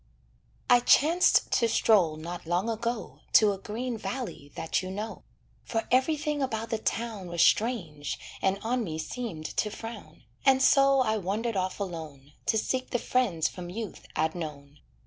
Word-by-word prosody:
I 245 - +7
chanced 330 +9 +4
to 230 - +3
stroll 185 -10 +3
not 170 +1 -7
long 180 +7 +1
ago 230 +1 -3
To 215 -2 +7
a 195 - -4
green 230 +3 -4
valley 220 - -5
that 165 - -1
you 185 - -6
know; 210 +3 -5 0.4
For 225 -1 -2
everything 295 +3 +1
about 225 -3 -2
the 225 - 0
town 220 -4 -3
Was 170 -1 +2
strange, 170 - +1 0.2
and 190 +1 +2
on 240 +2 0
me 160 -6 -4
seemed 170 -2 -5
to 210 - +1
frown, 215 -8 -9 0.2
And 265 -1 +5
so 275 0 +5
I 220 -3 +1
wandered 215 +4 -2
off 185 +1 -1
alone, 155 -7 -6
To 220 - +3
seek 255 +4 -1
the 245 - +1
friends 205 -11 +1
from 175 +1 -7
youth 215 +1 -6
I'd 160 +1 +1
known. 150 -4 -7
215 Hz, 165 wpm, -28 LUFS, 170-245 Hz, 0.4 s, I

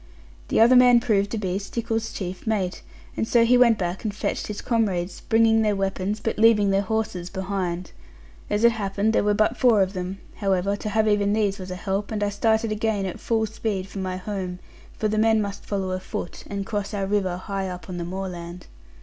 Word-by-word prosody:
The - - +1
other 235 +3 +7
man 250 -1 +7
proved 205 -4 +1
to 225 - -3
be 190 -2 -1
Stickles's 225 +2 -3
chief 185 +1 -6
mate; 195 -5 -1 0.3
and 225 - -1
so 235 0 +4
he 245 +2 +5
went 240 -3 +5
back 180 0 -3
and 215 - -1
fetched 205 - -3
his 210 -1 -5
comrades, 195 -6 -1
bringing 225 0 +3
their 210 -2 +2
weapons, 195 +1 -2
but 225 - -3
leaving 215 -3 +5
their 195 0 +3
horses 200 -4 -2
behind. 185 -2 -3 0.6
As 210 +2 0
it 235 - +7
happened 210 0 -1
there - - +3
were 205 0 +2
but 215 +3 +2
four 230 -6 +5
of 190 +1 -4
them; 185 +1 -4 0.2
however, 195 -1 +1
to 215 - -5
have 220 +1 +2
even 205 -1 +2
these 205 -2 0
was 185 0 -7
a 180 - -4
help; 195 +2 -2
and 210 -1 -1
I 205 - +1
started 220 +2 +1
again 215 -2 0
at 185 - -5
full 225 -1 0
speed 210 -3 -3
for 195 - -7
my 185 -1 -3
home; 185 -2 -4 0.4
for 215 - 0
the 215 0 0
men 220 0 +4
must 200 -1 -4
follow 195 -2 -2
afoot, 185 -1 -5
and 200 -1 -4
cross 205 0 -3
our 195 -1 -1
river 190 -3 0
high 195 0 -4
up 180 0 -8
on 180 -2 -5
the 175 - -3
moorland. 175 -1 -6
200 Hz, 215 wpm, -24 LUFS, 190-220 Hz, 0.6 s, other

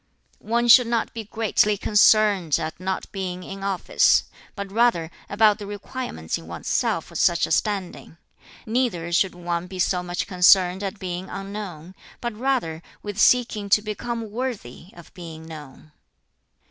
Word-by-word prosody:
"One 235 +2 0
should 240 0 +8
not 235 -1 -1
be 225 -2 -6
greatly 210 -1 +1
concerned 205 -5 +4
at 155 +1 -5
not 190 0 -3
being 185 -2 -5
in 195 +1 -8
office; 195 -2 +3 0.3
but 200 -2 -6
rather 200 -8 +2 0.2
about 210 0 +3
the 205 - -7
requirements 205 - -5
in 80 - -14
one's 85 -1 -8
self - - 0
for - - -16
such 170 -1 +2
a - - -8
standing. 190 -2 -2 0.5
Neither 215 -8 -1
should 185 +1 +2
one 175 0 -3
be 185 0 -8
so 180 0 +1
much 175 0 -3
concerned 185 0 +4
at 200 +1 -4
being 185 -1 -5
unknown; 195 -4 -7 0.3
but 235 -2 -4
rather 235 -10 -1 0.2
with 205 -1 -5
seeking 225 -4 +3
to 210 +1 +4
become 225 +1 -5
worthy 220 - -5
of 175 -2 -15
being 165 -3 -10
known." 155 -2 -12
195 Hz, 155 wpm, -23 LUFS, 175-215 Hz, 0.5 s, should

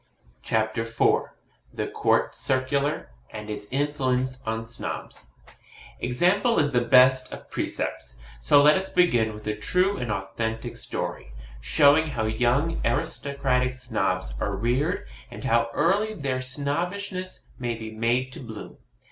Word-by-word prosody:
CHAPTER 110 0 0
IV 115 0 +2 0.5
THE - - -1
COURT - - +1
CIRCULAR, 140 +3 -1 0.2
AND 105 0 -7
ITS 105 -1 -6
INFLUENCE 130 -2 0
ON 115 0 -2
SNOBS 115 - -5 0.7
Example 180 - +2
is 145 -2 +3
the 120 -2 +3
best 130 +1 +5
of - - -10
precepts; - - -3 0.2
so 145 - +6
let 150 +1 +7
us 190 0 -1
begin 120 -12 +3
with 105 0 -10
a 105 0 -1
true 180 - +2
and 120 -3 -3
authentic 110 +3 -3
story, - - -4 0.3
showing 145 - +4
how 110 -7 -2
young 125 +9 +1
aristocratic 135 -5 0
snobs 95 - -1
are 100 - -1
reared, 125 - 0 0.2
and - - -9
how 115 0 +2
early 200 - +1
their 135 -7 -2
Snobbishness 180 +8 -3
may 120 -2 -2
be 110 -1 -7
made 120 +4 0
to - - -8
bloom. 110 -5 -9
130 Hz, 135 wpm, -26 LUFS, 110-145 Hz, 0.7 s, let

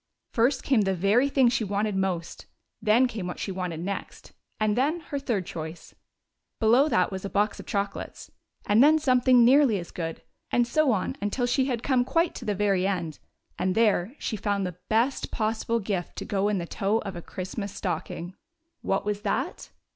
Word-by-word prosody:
First 250 +3 +2
came 260 -6 +3
tlie 195 -1 0
very 205 +10 +3
thing 270 -3 +4
she 235 -1 +1
wanted 205 0 -1
most, 185 -3 -3 0.3
then 225 +4 +4
came 215 -7 -5
what 180 - -5
she 195 - -4
wanted 180 -3 -4
next, 200 +3 -6 0.3
and 215 -1 +2
then 295 +7 +1
her 285 - -1
third 230 -9 -1
choice. 160 +1 -7 0.7
Below 245 +6 +4
that 185 -8 +2
was 190 -1 -5
a 200 - -4
box 205 0 0
of - - -10
chocolates, 200 0 -4 0.3
and 215 +5 +5
then 310 +2 +6
something 255 -4 +4
nearly 260 -3 +5
as 175 -2 -7
good, 165 -2 -5 0.3
and 240 - +2
so 300 +3 +2
on 195 -5 -1
until 205 +5 0
she 260 +2 +2
had 245 -3 -2
come 255 -3 +2
quite 330 +6 +1
to - - -8
the 210 - 0
very 195 -2 +1
end, 170 -6 -3 0.4
and 185 0 0
there 220 0 +2
she 220 - -3
found 200 -1 -1
the 180 -1 -6
best 235 +5 +1
possible 225 +1 -1
gift 195 -4 -3
to - - -5
go 200 -1 0
in 210 - 0
the 175 - -3
toe 200 +5 0
of 195 - -5
a 170 - -6
Christmas 190 +4 -5
stocking. 175 -1 -4 0.5
What 195 - -1
was 205 0 -2
that - - -2
210 Hz, 190 wpm, -26 LUFS, 190-245 Hz, 0.7 s, then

